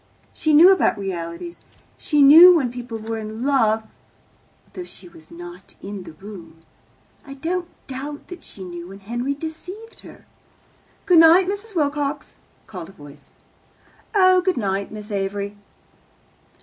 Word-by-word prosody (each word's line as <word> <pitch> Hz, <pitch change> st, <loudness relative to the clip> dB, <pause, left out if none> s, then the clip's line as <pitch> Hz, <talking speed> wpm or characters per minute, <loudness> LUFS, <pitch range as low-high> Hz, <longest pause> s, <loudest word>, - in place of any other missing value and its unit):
She 310 Hz, -, -1 dB
knew 330 Hz, +6 st, +8 dB
about 370 Hz, -, +1 dB
realities. 190 Hz, -, -6 dB, 0.4 s
She 295 Hz, -2 st, +1 dB
knew 335 Hz, +6 st, +9 dB
when 265 Hz, -7 st, 0 dB
people 245 Hz, -2 st, -7 dB
were 225 Hz, +1 st, -5 dB
in 220 Hz, +2 st, -7 dB
love, 225 Hz, -6 st, +2 dB, 0.9 s
though 365 Hz, -, -6 dB
she 195 Hz, -, -13 dB
was 160 Hz, -2 st, -17 dB
not 175 Hz, +2 st, -12 dB
in 195 Hz, -2 st, -8 dB
the 165 Hz, -, -11 dB
room. 170 Hz, -4 st, -12 dB, 0.6 s
I 275 Hz, -1 st, -10 dB
don't 345 Hz, +5 st, -3 dB, 0.2 s
doubt 280 Hz, +3 st, -7 dB
that 360 Hz, -, -10 dB
she 195 Hz, -, -11 dB
knew 175 Hz, -1 st, -8 dB
when 195 Hz, +2 st, -12 dB
Henry 240 Hz, +7 st, -3 dB
deceived 360 Hz, +9 st, -9 dB
her." -, -, -14 dB, 0.8 s
"Good 355 Hz, -3 st, +6 dB
night, 335 Hz, +3 st, +6 dB
Mrs. 405 Hz, +1 st, -5 dB
Wilcox," 290 Hz, -1 st, -2 dB, 0.3 s
called 180 Hz, -5 st, -9 dB
a -, -, -15 dB
voice. 145 Hz, -5 st, -16 dB, 0.8 s
"Oh, 370 Hz, -2 st, +5 dB
good 370 Hz, -1 st, 0 dB
night, 195 Hz, -3 st, -2 dB
Miss 215 Hz, 0 st, -9 dB
Avery." 200 Hz, +1 st, -3 dB
240 Hz, 145 wpm, -21 LUFS, 195-325 Hz, 0.9 s, knew